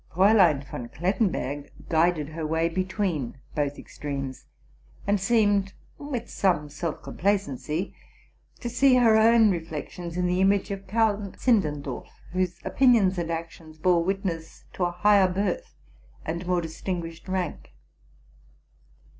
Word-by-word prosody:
Fraulein 185 -6 +5
von 125 -3 -7
Klettenberg 165 - -1 0.2
guided 160 -2 +2
her 160 +1 -6
way 160 +2 +1
between 185 - -2 0.2
both 145 -1 -1
extremes, 135 -3 -6 0.6
and 200 0 +2
seemed, 205 -2 +2 0.3
with 285 -5 -4
some 170 -6 +1
self 155 +2 -4
com - - -9
placeney, 175 -4 -1 0.7
to - - -3
see 265 +2 +4
her 235 -3 +5
own 220 -1 +6
reflections 170 +1 -5
in 180 - +1
the 180 +1 +1
image 195 +1 +2
of 195 -1 -6
Count 210 -1 0
Zindendorf, 155 - 0 0.2
whose 185 0 -1
opinions 225 -8 +4
and 170 -1 -2
actions 165 -1 -6
bore 170 +1 +3
witness 180 -3 -3
to 180 - 0
a 175 - -1
higher 200 +2 +4
birth 200 - -2 0.5
and_more 175 +2 -1
distinguished 165 +1 -5
rank. 180 - -3
180 Hz, 125 wpm, -26 LUFS, 160-200 Hz, 0.7 s, own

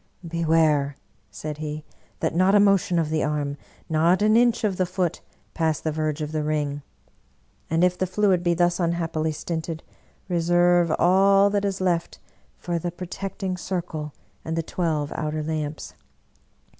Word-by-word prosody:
" 175 - -14
Beware," 160 -4 +2 0.3
said 150 -1 -6
he, 155 0 -5 0.2
" - - -35
that - - 0
not 185 +4 +4
a - - +7
motion 195 -3 +3
of 160 -2 0
the 155 - +1
arm, 150 -1 -1 0.3
not 170 +5 +3
an 215 +1 +4
inch 235 0 +3
of 200 -4 0
the 185 - +1
foot, 180 -2 -2 0.3
pass 160 -2 0
the 155 - -2
verge 155 0 -2
of 150 - -5
the 155 -1 -1
ring; 150 -1 -1 0.9
and 165 +2 +2
if 180 0 +2
the 185 - +1
fluid 190 -1 +2
be 175 -1 +1
thus 175 +1 +2
unhappily 165 -2 0
stinted, 160 +1 -4 0.4
reserve 175 -1 +3
all 195 +2 +5
that 205 0 0
is 195 -1 -2
left 175 -2 0 0.4
for 175 -1 -2
the 175 - -3
protecting 185 +2 -5
circle 170 -4 -4 0.3
and 160 - -3
the 165 - -1
twelve 155 -4 -2
outer 155 0 -3
lamps! 155 -1 -4
170 Hz, 165 wpm, -24 LUFS, 155-185 Hz, 0.9 s, a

